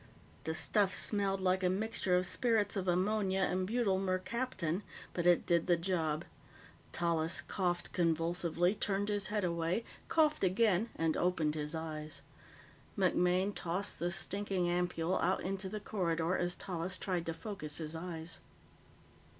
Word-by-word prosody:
The 160 - -1
stuff 200 +4 +2
smelled 195 -1 +1
like 185 0 +2
a 180 - +4
mixture 200 -1 +1
of 180 0 +3
spirits 215 +1 +1
of 190 -2 -2
ammonia 190 +1 +1
and 185 0 +1
butyl 215 -4 +1
mercaptan, 185 -1 -1 0.3
but 175 -1 0
it 175 -1 +5
did 170 -1 +2
the 175 -1 +4
job. 165 -3 -1 0.7
Tallis 165 -1 +1
coughed 175 -2 -2
convulsively, 170 +1 +1
turned 205 -1 -1
his 205 -2 0
head 210 -1 -1
away, 170 +4 0 0.2
coughed 305 -4 +3
again, 205 +2 +3
and 160 -1 +1
opened 170 -4 +1
his 150 +1 -3
eyes. 155 -1 -5 0.8
MacMaine 185 +1 +2
tossed 190 +3 -2
the 175 - 0
stinking 185 +1 -1
ampoule 175 0 0
out 185 +3 +1
into 190 +1 -3
the 215 - -4
corridor 175 -4 0
as 175 0 0
Tallis 185 0 -3
tried 180 -3 -2
to 165 - -1
focus 185 -10 -5
his 160 -1 -4
eyes. 165 -1 -6
180 Hz, 145 wpm, -34 LUFS, 170-195 Hz, 0.8 s, it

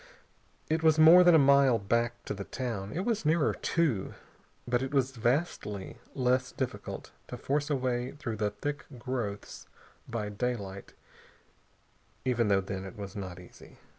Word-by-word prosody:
It 160 +1 0
was 160 -1 +4
more 165 +3 +9
than 175 -2 +7
a - - +8
mile 140 -3 +5
back 115 +3 -1
to - - -3
the 100 -1 -5
town. 110 -4 -4
It 185 +5 -3
was 230 -3 0
nearer 155 0 +2
two. 140 - 0 0.5
But 120 0 +1
it 130 - -3
was 135 -1 +2
vastly 120 - -2 0.2
less 130 0 +1
difficult 130 -2 -5 0.2
to - - -7
force 145 +2 -1
a 145 - +2
way 125 -1 -2
through 120 -7 -5
the 105 0 0
thick 145 +8 -5
growths 120 -5 -5 0.4
by 110 -3 -3
daylight, 100 -3 -4 1.3
even 120 -3 +2
though 100 -1 +3
then 95 0 -5
it 95 +4 -9
was 100 -2 -7
not 95 -3 -6
easy. 90 - -15
125 Hz, 160 wpm, -30 LUFS, 105-140 Hz, 1.3 s, more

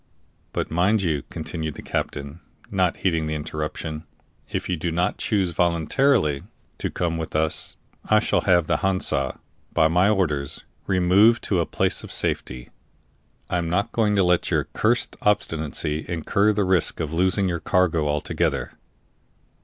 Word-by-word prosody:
"But, - - -3
mind 95 +5 +2
you," 80 -5 0
continued 80 -1 -4
the - - -9
captain, 70 +3 -4 0.3
not 95 -3 +1
heeding 80 -4 0
the 75 - -2
interruption, 75 +1 -5 0.4
"if - - -3
you 90 - 0
do 85 +2 -2
not 85 +2 0
choose 95 -5 0
voluntarily 85 - +2 0.4
to - - -1
come 85 -2 -2
with 80 - -5
us, 80 0 -1 0.3
I 110 - +4
shall - - +1
have 90 -4 +3
the - - +1
Hansa, 95 -8 0 0.3
by 80 -2 +4
my 90 +4 +4
orders, 75 -9 -1 0.2
removed 95 +5 +4
to 95 - +1
a 85 - 0
place - - 0
of - - -9
safety. 60 0 -2 0.8
I 90 - 0
am 85 -1 -2
not 100 +6 0
going 105 -3 +2
to 100 - +4
let 90 -1 +2
your - - +2
cursed 115 +2 +1
obstinacy 80 -6 0
incur 100 +5 +2
the 105 -1 +1
risk 90 -3 +1
of 80 -1 -3
losing 95 +3 +2
your 85 -2 -1
cargo 80 -2 +1
altogether." 75 0 -1
85 Hz, 155 wpm, -24 LUFS, 80-95 Hz, 0.8 s, I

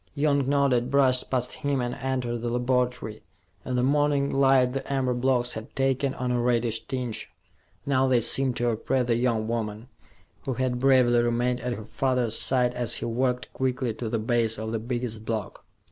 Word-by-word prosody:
Young 140 -2 +1
nodded, 135 -4 +2
brushed 130 -2 +2
past 125 -1 -1
him, 140 -2 0
and 120 0 -2
entered 125 -3 -3
the 120 +1 -3
laboratory. 125 -2 -1 0.4
In 130 - -3
the 125 - +1
morning 145 0 +2
light 135 -2 +3
the 135 +1 -5
amber 130 -2 0
blocks 125 0 +1
had 110 +4 -8
taken 135 0 0
on 125 0 -2
a 120 -1 +1
reddish 120 -2 0
tinge. 125 -4 -4 0.6
Now, 135 -1 +2
they 125 -2 +3
seemed 125 +2 +1
to 120 0 0
oppress 125 +3 0
the 120 -1 +1
young 115 -2 0
woman, 110 0 -4 0.6
who 130 - -2
had 125 0 -1
bravely 125 -2 +4
remained 120 +1 0
at 125 0 -3
her 110 -3 -7
father's 125 -1 0
side 125 -1 +3
as 120 -3 0
he - - -4
walked 125 +2 -1
quickly 130 -2 -1
to 115 +1 -5
the 115 - -1
base 115 0 +1
of 110 +1 -4
the 115 - -2
biggest 120 -1 -4
block. 110 -3 -4
125 Hz, 185 wpm, -26 LUFS, 120-130 Hz, 0.6 s, bravely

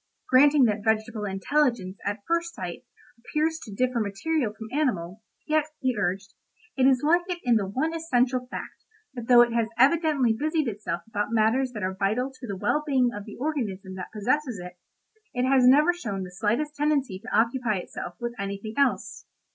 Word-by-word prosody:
Granting 280 +2 +6
that 210 -2 0
vegetable 220 0 0
intelligence 200 0 0
at 205 0 -3
first 335 0 -1
sight 180 +6 -6 0.4
appears 315 +6 -1
to 220 - -10
differ 250 +4 0
materially 225 +5 -1
from 220 - -7
animal, 220 - -1 0.2
yet, 310 -1 +2
he 260 -3 0
urged, 195 -1 -2 0.4
it 260 -1 +4
is 260 -1 +3
like 340 +4 +4
it 360 - -1
in 245 -2 +3
the 205 -3 +1
one 270 +11 -1
essential 255 -6 0
fact - - -8 0.3
that 240 -3 -7
though 240 -1 +8
it 235 -1 -2
has 230 -1 +1
evidently 280 -2 +3
busied 305 +4 -1
itself 205 -5 -4
about 210 -1 -3
matters 230 +4 +2
that 210 -3 -5
are 185 0 -1
vital 215 +7 -1
to 255 -1 -10
the 200 -2 -4
well 300 +10 0
being 260 -5 +2
of 205 0 -7
the 210 - -10
organism 220 -10 -3
that 185 -1 -7
possesses 245 +3 -1
it, 180 0 -10 0.6
it 250 +1 +1
has 260 -2 +5
never 300 +7 +6
shown 205 - -4
the 180 - -8
slightest 230 +11 -1
tendency 285 -9 0
to 235 +5 -9
occupy 230 -1 +1
itself 175 -1 -7
with 240 -1 -3
anything 200 +2 -4
else. 280 -3 0
240 Hz, 185 wpm, -26 LUFS, 205-280 Hz, 0.6 s, though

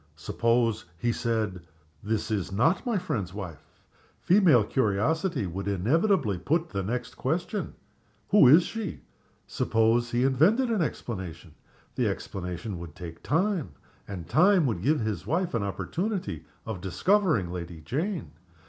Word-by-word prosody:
Suppose 115 +7 +1
he 120 +8 0
said, 110 -6 -1 0.4
"She 110 +1 -1
is 100 -2 -2
not 160 - +2
my 235 -4 +1
friend's 115 - -3
wife?" 90 -7 -7 0.6
Female 175 - +5
curiosity 130 - 0
would 95 +3 -5
inevitably 110 - +2
put 160 - 0
the 100 - -2
next 120 +6 -3
question, 175 +8 -2 0.5
"Who 200 -9 +7
is 155 +7 +8
she?" 220 -3 -5 0.4
Suppose 115 +2 +1
he 120 +1 +1
invented 185 - +3
an 215 -5 +1
explanation? 95 - -5 0.4
The - - 0
explanation 90 +1 -4
would 85 -3 -9
take 85 -2 -9
time, 170 - 0 0.3
and 90 -5 -7
time 180 - +4
would 110 -9 -1
give 145 +5 +2
his 105 -4 -3
wife 170 +6 0
an 115 - 0
opportunity 100 - -3 0.2
of 110 -5 -5
discovering 155 - +2
Lady 85 -2 -6
Jane. 160 - -3
115 Hz, 135 wpm, -27 LUFS, -, 0.6 s, is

